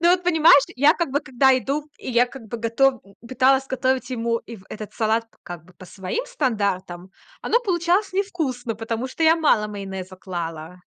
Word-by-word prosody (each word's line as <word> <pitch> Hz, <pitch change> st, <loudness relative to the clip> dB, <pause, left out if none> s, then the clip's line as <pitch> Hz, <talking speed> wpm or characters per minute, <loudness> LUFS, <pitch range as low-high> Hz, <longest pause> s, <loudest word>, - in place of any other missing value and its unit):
Ну 345 Hz, +1 st, +4 dB
вот 360 Hz, 0 st, +2 dB
понимаешь, 320 Hz, -5 st, +6 dB
я 290 Hz, +4 st, +5 dB
как 340 Hz, -6 st, -2 dB
бы, 285 Hz, +2 st, 0 dB
когда 265 Hz, -1 st, +3 dB
иду, 290 Hz, +4 st, -3 dB
и -, -, -6 dB
я 245 Hz, +1 st, +3 dB
как 265 Hz, 0 st, -11 dB
бы 235 Hz, -, -4 dB
готов 240 Hz, +3 st, +1 dB, 0.3 s
пыталась 265 Hz, +1 st, +2 dB
готовить 260 Hz, 0 st, -1 dB
ему, 230 Hz, -1 st, -1 dB
и 230 Hz, -, -11 dB
в 190 Hz, -, -17 dB
этот 215 Hz, -1 st, -8 dB
салат, 225 Hz, +1 st, 0 dB, 0.2 s
как 175 Hz, -2 st, -8 dB
бы, 180 Hz, -, -20 dB
по 185 Hz, -, -13 dB
своим 190 Hz, -, -4 dB
стандартам, 200 Hz, -, -2 dB, 0.3 s
оно 475 Hz, -, +1 dB
получалось 365 Hz, -1 st, 0 dB
невкусно, 310 Hz, -, -2 dB
потому 230 Hz, +3 st, -4 dB
что 290 Hz, -, -5 dB
я 320 Hz, +1 st, +5 dB
мало 255 Hz, -10 st, +2 dB
майонеза 190 Hz, -2 st, -7 dB
клала. 170 Hz, -2 st, -6 dB
250 Hz, 185 wpm, -22 LUFS, 210-300 Hz, 0.3 s, понимаешь